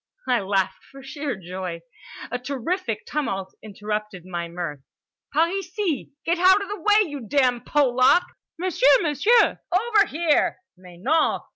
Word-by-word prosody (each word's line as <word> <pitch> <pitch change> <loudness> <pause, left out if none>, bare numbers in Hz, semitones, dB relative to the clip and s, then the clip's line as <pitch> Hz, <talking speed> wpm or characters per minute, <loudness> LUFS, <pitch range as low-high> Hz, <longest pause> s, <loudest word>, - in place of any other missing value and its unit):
I 250 -2 +3
laughed 190 -1 -1
for 275 0 -12
sheer 285 -1 -4
joy. 180 -2 -6 0.5
A 250 - -2
terrific 255 - -3
tumult 195 -11 -3
interrupted 210 -2 -5
my 175 -2 -4
mirth. 170 -4 -5 0.5
"Par 320 +3 +3
ici!"—"Get 350 - -3
out 375 +2 +6
of 400 - -9
the 415 -1 -5
way 420 +2 +4
you 285 -7 -7
damn 250 -2 +2
Polak!"—"M'sieu, 290 +3 +2
M'sieu!"—"Over 410 - +2
here!"—"_Mais 290 - -2
non! 315 +5 +2
275 Hz, 120 wpm, -23 LUFS, -, 0.5 s, out